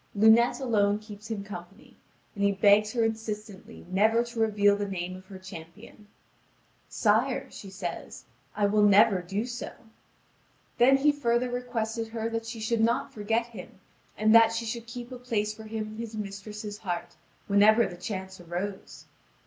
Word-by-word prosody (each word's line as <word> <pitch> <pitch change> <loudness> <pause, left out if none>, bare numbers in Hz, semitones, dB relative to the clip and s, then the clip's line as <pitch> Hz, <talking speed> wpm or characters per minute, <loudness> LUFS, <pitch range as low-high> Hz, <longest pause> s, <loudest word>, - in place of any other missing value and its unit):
Lunete 220 +5 +5
alone 205 -6 +2
keeps 210 0 -11
him 210 -3 -3
company, 195 0 -11 0.4
and 200 - -3
he 200 - +4
begs 205 +2 +4
her 235 -2 +1
insistently 215 -3 -5
never 215 +5 +3
to 235 -1 -7
reveal 205 -2 +3
the 205 0 -3
name 185 -1 -4
of 185 0 -13
her 195 -1 -9
champion. 190 +3 -12 0.8
"Sire," - - +1
says 190 -3 -7
she, - - -36
"I 210 - +2
will 210 +1 +3
never 205 -2 +5
do 195 +5 -3
so." 245 0 -6 1.1
Then 265 +3 +6
he 295 +2 +4
further 245 -3 0
requested 230 -2 -3
her 225 0 -3
that 225 0 -3
she 230 - -6
should 225 +1 0
not 235 +4 +1
forget 225 +2 0
him, 215 -5 -12 0.4
and 215 +1 +4
that 230 0 +7
she 230 0 -3
should 230 +1 -5
keep 240 +1 -8
a 250 - -7
place 215 -4 -1
for 220 0 -11
him 215 0 -4
in 215 - -10
his 230 -1 -6
mistress' 210 +1 -6
heart, 175 -5 -4 0.3
whenever 215 +3 +5
the 175 - -6
chance 190 0 -6
arose. 180 +3 -6
215 Hz, 165 wpm, -28 LUFS, 200-230 Hz, 1.1 s, that